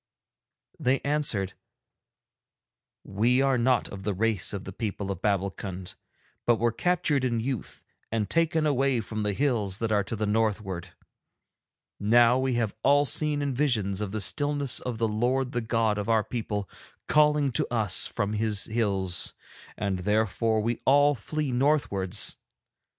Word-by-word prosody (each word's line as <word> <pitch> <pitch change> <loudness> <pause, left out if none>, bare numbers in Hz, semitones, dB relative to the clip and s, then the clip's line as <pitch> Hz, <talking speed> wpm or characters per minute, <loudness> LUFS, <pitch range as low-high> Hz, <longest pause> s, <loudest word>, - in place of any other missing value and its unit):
They 130 +2 +2
answered: 140 -10 0 1.5
'We 120 +7 +2
are 135 -2 +2
not 125 -1 +2
of 100 - -8
the 100 0 -2
race 110 -1 +1
of 100 -2 -4
the - - -8
people 100 -3 -4
of 95 -2 -6
Babbulkund, 95 -2 -2 0.5
but 120 - +5
were 115 +1 +1
captured 150 0 0
in 120 -3 0
youth 125 -2 -4 0.3
and 110 -2 -1
taken 160 - +1
away 135 -3 +2
from 110 0 -4
the 105 -1 -1
hills 110 -7 0
that 115 0 -2
are 105 -1 +2
to 115 - -4
the 110 0 -2
northward. 105 -5 -1 1.0
Now 120 +4 +4
we 130 -1 0
have 115 -3 0
all 145 +3 +4
seen 150 0 0
in 140 -2 -1
visions 110 -8 0
of 105 -2 -3
the 110 0 -3
stillness 145 +4 +1
the 115 -2 -1
Lord 125 +4 0
the 120 - -1
God 110 -2 0
of 105 +2 -4
our 110 -1 +3
people 105 -4 -4 0.4
calling 150 -2 +3
to 120 - -1
us 105 -6 +2
from 105 -2 -2
His 105 -1 0
hills, 100 -5 0 0.4
and 100 -3 -2
therefore 110 +3 +1
we 115 +2 -2
all 145 +2 +5
flee 145 +4 -3
northwards. 120 -8 +1
115 Hz, 150 wpm, -27 LUFS, 100-130 Hz, 1.5 s, but